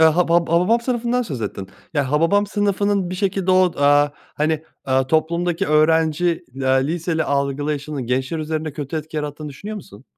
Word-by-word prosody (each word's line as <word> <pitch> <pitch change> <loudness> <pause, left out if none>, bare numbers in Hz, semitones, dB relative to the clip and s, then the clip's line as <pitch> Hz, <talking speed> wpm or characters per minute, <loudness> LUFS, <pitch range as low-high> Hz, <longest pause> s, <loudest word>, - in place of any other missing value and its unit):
Haba 165 +2 +4
Hababam 175 +7 +3
Sınıfı'ndan 245 0 0
söz 140 - -5
ettin. 100 -2 -5 0.3
Ya, 140 -2 0
Hababam 165 +7 +3
Sınıfı'nın 200 -2 0
bir - - -3
şekilde 190 -1 0
o, 185 -1 +4
aaa, 145 +1 +5 0.3
hani, 155 +1 0 0.2
aaa, 130 0 +1
toplumdaki 170 +3 0
öğrenci, 160 +3 +2
eee, 130 0 +1
liseli 165 0 -1
algılayışının 140 -1 -2
gençler 130 +5 -1
üzerine 155 -1 -3
kötü 145 +1 -5
etki 155 +1 -6
yarattığını 150 0 -4
düşünüyor 200 +10 -7
musun? 115 - -12
160 Hz, 155 wpm, -21 LUFS, 145-180 Hz, 0.3 s, aaa